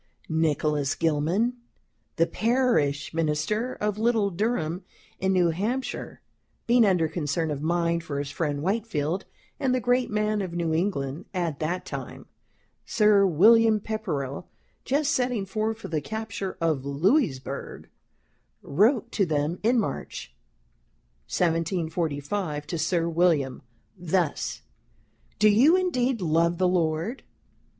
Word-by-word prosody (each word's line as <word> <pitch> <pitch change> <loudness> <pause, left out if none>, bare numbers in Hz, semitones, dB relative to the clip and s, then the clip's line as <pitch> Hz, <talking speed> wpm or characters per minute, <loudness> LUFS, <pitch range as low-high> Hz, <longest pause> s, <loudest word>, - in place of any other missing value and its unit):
Nicholas 150 -3 +1
Gilman, 165 +10 +1 0.6
the 165 - +3
parish 225 - +1
minister 165 +10 -1
of 210 0 -2
little 220 -3 +2
Durham, 180 -3 -1 0.4
in 190 0 +1
New 180 -3 +3
Hampshire, 225 +10 -3 0.4
being 240 0 +5
under 180 -4 +2
concern 160 0 -2
of 145 -1 -4
mind 170 +1 0
for 145 -4 -4
his 140 0 -3
friend 145 -2 -2
Whitefield, 190 -4 -1 0.3
and 255 -2 +1
the - - +1
great 245 +1 +1
man 210 0 0
of 185 -3 -4
New 165 -2 0
England, 160 -3 -2
at 170 -5 -2
that 175 +4 -2
time, - - -7 0.6
Sir 210 -2 +4
William 220 +6 +5
Pepperell, 180 -11 -4 0.4
just 290 +3 +1
setting 250 -7 0
forth 215 +3 -2
for 225 - -8
the 155 -2 -2
capture 220 0 -5
of 160 -5 0
Louisburg 140 - -1 0.8
wrote 225 - +2
to 200 - +1
them 155 +2 -1
in 235 +3 +3
March, 135 - -4 0.9
1745, 165 - -1
to 165 +2 -4
Sir 165 +1 +1
William 165 -6 +1 0.3
thus: 175 -3 -1 0.7
"Do 215 - +5
you 250 - +6
indeed 260 - 0
love 170 +1 +2
the 185 0 +2
Lord? 175 +6 0
180 Hz, 125 wpm, -26 LUFS, 155-220 Hz, 0.9 s, you